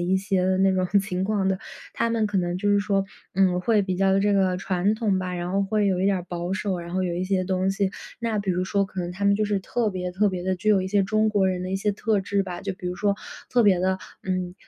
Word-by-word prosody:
一 180 Hz, +2 st, +1 dB
些 190 Hz, -1 st, 0 dB, 0.2 s
那 190 Hz, 0 st, +4 dB
种 185 Hz, -1 st, +1 dB
情 185 Hz, -2 st, -3 dB
况 200 Hz, -1 st, 0 dB
的。 190 Hz, -1 st, +1 dB, 0.3 s
他 230 Hz, -, 0 dB
们 230 Hz, -2 st, +1 dB
可 205 Hz, -2 st, 0 dB
能 175 Hz, -1 st, -1 dB
就 205 Hz, +3 st, 0 dB
是 205 Hz, -, +4 dB
说， 200 Hz, -1 st, +1 dB, 0.3 s
嗯， 185 Hz, -1 st, +3 dB
会 210 Hz, +2 st, +2 dB
比 190 Hz, -1 st, -2 dB
较 195 Hz, +1 st, +3 dB
这 205 Hz, +1 st, +2 dB
个 190 Hz, -2 st, +2 dB
传 190 Hz, +2 st, 0 dB
统 215 Hz, -4 st, 0 dB
吧， 185 Hz, -1 st, -3 dB
然 175 Hz, +1 st, -3 dB
后 200 Hz, +1 st, +2 dB
会 205 Hz, +1 st, +1 dB
有 185 Hz, -2 st, +1 dB
一 190 Hz, -, +2 dB
点 200 Hz, -, +3 dB
儿 180 Hz, -, -4 dB
保 175 Hz, 0 st, -4 dB
守。 190 Hz, -2 st, -2 dB
然 170 Hz, +1 st, -7 dB
后 185 Hz, -, +1 dB
有 180 Hz, -2 st, -1 dB
一 175 Hz, -, -2 dB
些 185 Hz, -1 st, 0 dB
东 185 Hz, +1 st, 0 dB
西 195 Hz, 0 st, 0 dB, 0.3 s
那 230 Hz, -2 st, -1 dB
比 200 Hz, -2 st, -1 dB
如 180 Hz, 0 st, 0 dB
说 200 Hz, +1 st, +1 dB
可 190 Hz, -, -10 dB
能 175 Hz, 0 st, -3 dB
他 195 Hz, +3 st, -4 dB
们 200 Hz, -, +5 dB
就 215 Hz, -, +1 dB
是 205 Hz, -1 st, 0 dB
特 225 Hz, +3 st, -1 dB
别 180 Hz, -1 st, -3 dB
特 200 Hz, +3 st, +2 dB
别 180 Hz, -1 st, -4 dB
地 185 Hz, 0 st, 0 dB
具 215 Hz, +4 st, +1 dB
有 200 Hz, -, +4 dB
一 185 Hz, -, -3 dB
些 200 Hz, 0 st, +3 dB
中 215 Hz, +2 st, +2 dB
国 205 Hz, -3 st, +2 dB
人 185 Hz, -1 st, -1 dB
的 185 Hz, -, -4 dB
一 190 Hz, -, 0 dB
些 205 Hz, +1 st, 0 dB
特 210 Hz, +1 st, 0 dB
质 200 Hz, 0 st, 0 dB
吧， 180 Hz, -2 st, -6 dB
就 195 Hz, 0 st, -2 dB
比 185 Hz, -1 st, -8 dB
如 180 Hz, -, -2 dB
说 200 Hz, +1 st, +1 dB, 0.4 s
特 245 Hz, -, +4 dB
别 200 Hz, -4 st, +5 dB
地， 185 Hz, +1 st, +1 dB, 0.2 s
嗯， 185 Hz, -1 st, -2 dB
190 Hz, 305 characters per minute, -25 LUFS, 185-205 Hz, 0.4 s, 们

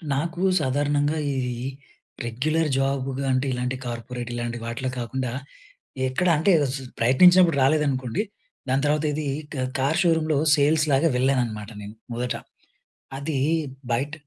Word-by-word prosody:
నాకు 165 Hz, +5 st, -2 dB, 0.2 s
సాధారణంగా 145 Hz, +2 st, +1 dB
ఈ -, -, -1 dB, 0.3 s
ఈ -, -, -2 dB, 0.6 s
రెగ్యులర్ 155 Hz, +7 st, 0 dB
జాబ్‌గా 135 Hz, 0 st, -1 dB
అంటే 130 Hz, +2 st, +1 dB
ఇలాంటి 125 Hz, +1 st, -2 dB
కార్పొరేట్ 120 Hz, 0 st, -5 dB
ఇలాంటి 120 Hz, 0 st, -3 dB
వాటిలో 125 Hz, +3 st, -3 dB
కాకుండా 125 Hz, +1 st, -3 dB, 0.8 s
ఎక్కడ 145 Hz, +8 st, 0 dB
అంటే 165 Hz, +6 st, +3 dB, 0.2 s
స్ -, -, -2 dB, 0.2 s
ప్రయత్నించినప్పుడు 170 Hz, +7 st, +6 dB
రాలేదనుకోండి, 135 Hz, -, +1 dB, 0.5 s
దాని 135 Hz, +2 st, +1 dB
తర్వాత 150 Hz, +1 st, +1 dB
ఇది 150 Hz, 0 st, -3 dB, 0.3 s
కా 130 Hz, -2 st, -2 dB, 0.2 s
కార్ 145 Hz, +6 st, +1 dB
షోరూంలో 160 Hz, -3 st, +2 dB, 0.2 s
సేల్స్‌లాగా 150 Hz, +1 st, +3 dB
వెళ్ళానన్నమాట 120 Hz, -5 st, 0 dB
నేను 105 Hz, +2 st, -9 dB, 0.2 s
మొదట. 125 Hz, +1 st, -2 dB, 0.8 s
అది 140 Hz, 0 st, -2 dB, 0.5 s
బయట 135 Hz, +5 st, -1 dB
135 Hz, 120 wpm, -24 LUFS, 125-155 Hz, 0.8 s, ప్రయత్నించినప్పుడు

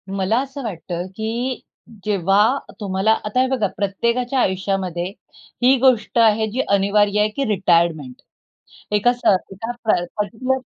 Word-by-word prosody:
मला 195 Hz, +4 st, +1 dB
असं 275 Hz, 0 st, -7 dB
वाटतं 175 Hz, -4 st, -5 dB
की 235 Hz, +4 st, -3 dB, 0.5 s
जेव्हा 205 Hz, +5 st, +3 dB, 0.2 s
तुम्हाला 195 Hz, +1 st, 0 dB
आता 210 Hz, +5 st, +1 dB
हे 260 Hz, -, +2 dB
बघा 255 Hz, -6 st, 0 dB
प्रत्येकाच्या 235 Hz, +6 st, 0 dB
आयुष्यामध्ये 190 Hz, -4 st, -1 dB, 0.6 s
ही 260 Hz, +2 st, +6 dB
गोष्ट 250 Hz, -3 st, +2 dB
आहे 220 Hz, -1 st, +4 dB
जी 260 Hz, +4 st, 0 dB
अनिवार्य 200 Hz, +1 st, +2 dB
आहे 210 Hz, -, +3 dB
की 280 Hz, -, -1 dB
रिटायरमेंट. 170 Hz, -8 st, +1 dB, 0.8 s
एका 210 Hz, +4 st, +3 dB
स 245 Hz, -, -11 dB, 0.3 s
एका 225 Hz, +5 st, -6 dB
प्र 220 Hz, -, +4 dB, 0.3 s
पर्टिक्युलर 255 Hz, +5 st, -1 dB
210 Hz, 135 wpm, -20 LUFS, 195-245 Hz, 0.8 s, ही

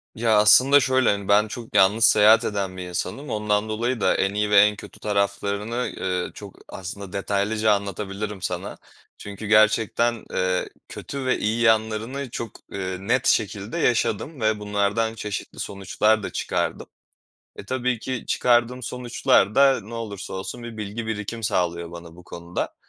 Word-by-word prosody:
Ya, 110 Hz, -1 st, +2 dB
aslında 130 Hz, +7 st, +7 dB
şöyle, 130 Hz, -1 st, +2 dB
hani, 100 Hz, -1 st, -1 dB
ben 105 Hz, +1 st, +4 dB
çok 115 Hz, +1 st, -9 dB
yalnız 105 Hz, +4 st, +5 dB
seyahat 110 Hz, +1 st, +6 dB
eden 100 Hz, -3 st, -3 dB
bir 90 Hz, -, -5 dB
insanım. 130 Hz, -, -4 dB
Ondan 105 Hz, 0 st, 0 dB
dolayı 115 Hz, +2 st, -2 dB
da -, -, +3 dB
en 100 Hz, +1 st, 0 dB
iyi 105 Hz, 0 st, 0 dB
veren 105 Hz, 0 st, +5 dB
kötü -, -, -12 dB
taraflarını, 100 Hz, +3 st, -1 dB
eee, 90 Hz, -1 st, -3 dB
çok 100 Hz, -2 st, -11 dB
aslında 95 Hz, +1 st, -8 dB
detaylıca 105 Hz, +2 st, 0 dB
anlatabilirim 100 Hz, 0 st, -4 dB
sana. -, -, -4 dB, 0.4 s
Çünkü 100 Hz, +1 st, -8 dB
gerçekten, 110 Hz, +2 st, +3 dB
eee, 90 Hz, 0 st, 0 dB, 0.2 s
kötü 140 Hz, -2 st, -6 dB
ve 130 Hz, -, +2 dB
iyi 110 Hz, +2 st, 0 dB
yanlarını 115 Hz, +4 st, +1 dB
çok, 115 Hz, 0 st, -5 dB, 0.2 s
eee, 95 Hz, -1 st, -4 dB
net 120 Hz, +6 st, 0 dB
şekilde 105 Hz, 0 st, 0 dB
yaşadım 125 Hz, +4 st, 0 dB
ve 110 Hz, -1 st, +1 dB
bunlardan 105 Hz, +2 st, 0 dB
çeşitli 105 Hz, -2 st, -6 dB
sonuçlar 105 Hz, +2 st, 0 dB
da -, -, -3 dB
çıkardım. -, -, -2 dB, 0.7 s
E, -, -, -9 dB
tabii 125 Hz, +1 st, -1 dB
ki 130 Hz, +2 st, -5 dB
çıkardığım 120 Hz, +1 st, +2 dB
sonuçlar 125 Hz, -3 st, +1 dB
da 135 Hz, -2 st, +5 dB
ne 110 Hz, +3 st, -10 dB
olursa 105 Hz, -5 st, -6 dB
olsun 95 Hz, +6 st, -6 dB
bir 120 Hz, -1 st, -8 dB
bilgi 105 Hz, +2 st, -5 dB
birikim 110 Hz, +1 st, -4 dB
sağlıyor 85 Hz, -4 st, -1 dB
bana 85 Hz, -1 st, -11 dB
bu 90 Hz, -, -14 dB
konuda. 85 Hz, -1 st, -5 dB
105 Hz, 155 wpm, -23 LUFS, 100-115 Hz, 0.7 s, aslında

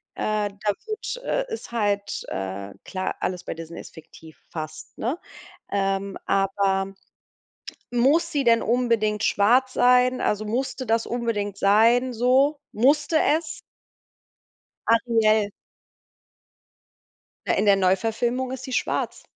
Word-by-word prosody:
äh, 210 Hz, -1 st, -1 dB
da 205 Hz, +1 st, -2 dB
wird 460 Hz, +3 st, -4 dB
äh, -, -, 0 dB
ist 450 Hz, -, -7 dB
halt, 205 Hz, -3 st, -1 dB
äh, 95 Hz, +1 st, -5 dB
klar, 185 Hz, -1 st, -3 dB
alles 180 Hz, -1 st, -2 dB
bei -, -, -3 dB
Disney 165 Hz, +1 st, -8 dB
ist -, -, -11 dB
fiktiv 160 Hz, 0 st, -14 dB
fast, 155 Hz, -1 st, -7 dB
ne? 255 Hz, +9 st, -1 dB, 0.5 s
Ähm, 195 Hz, 0 st, -1 dB
aber 195 Hz, 0 st, +1 dB, 1.0 s
muss 285 Hz, +8 st, +3 dB
sie 285 Hz, -3 st, 0 dB
denn 230 Hz, -1 st, +4 dB
unbedingt 230 Hz, -3 st, +1 dB
schwarz 250 Hz, +6 st, +3 dB
sein, 250 Hz, +1 st, +4 dB
also 210 Hz, +1 st, 0 dB
musste 255 Hz, +2 st, -2 dB
das 225 Hz, +1 st, +1 dB
unbedingt 210 Hz, -4 st, -2 dB
sein, 230 Hz, +5 st, +4 dB
so? 265 Hz, +5 st, +2 dB
Musste 290 Hz, +7 st, +2 dB, 0.2 s
es? 330 Hz, 0 st, -9 dB, 1.3 s
Ariel. 220 Hz, -2 st, +3 dB, 2.0 s
Ja, -, -, +1 dB
in 205 Hz, -, +1 dB
der 200 Hz, -, +7 dB
Neuverfilmung 225 Hz, +7 st, 0 dB
ist 260 Hz, 0 st, -6 dB
sie 260 Hz, -2 st, -6 dB
schwarz. -, -, -1 dB
225 Hz, 120 wpm, -24 LUFS, 195-255 Hz, 2.0 s, der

